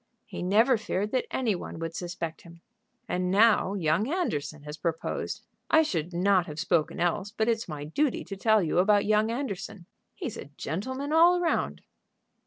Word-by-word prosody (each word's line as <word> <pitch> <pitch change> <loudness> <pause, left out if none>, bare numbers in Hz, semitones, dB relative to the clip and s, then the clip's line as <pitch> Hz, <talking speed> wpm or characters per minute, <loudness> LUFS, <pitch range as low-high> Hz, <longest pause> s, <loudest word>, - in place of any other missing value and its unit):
"He - - -7
never 220 +7 +3
feared 210 0 -2
that 255 - 0
any 240 -5 0
one 175 - -6
would 165 0 -5
suspect 170 -2 -5
him." 170 -1 -15 0.5
"And 180 -3 -1
now 205 0 +4
young 180 - +1
Anderson 155 - -2
has 150 0 -7
proposed. 165 0 -3 0.3
I 320 - +6
should 170 - -2
not 185 +1 +2
have 150 0 -7
spoken 165 -1 0
else, 175 +3 0
but 220 +2 -1
it's 230 -1 0
my 150 -2 -5
duty 250 - 0
to 195 - -7
tell 220 +1 +3
you 165 +1 +1
about 205 +2 +4
young 215 +1 +3
Anderson. 210 -6 -4 0.3
He's 305 - -5
a - - -7
gentleman 260 - -3
all 345 +2 +6
round." 345 -1 -1
195 Hz, 175 wpm, -28 LUFS, 170-230 Hz, 0.5 s, I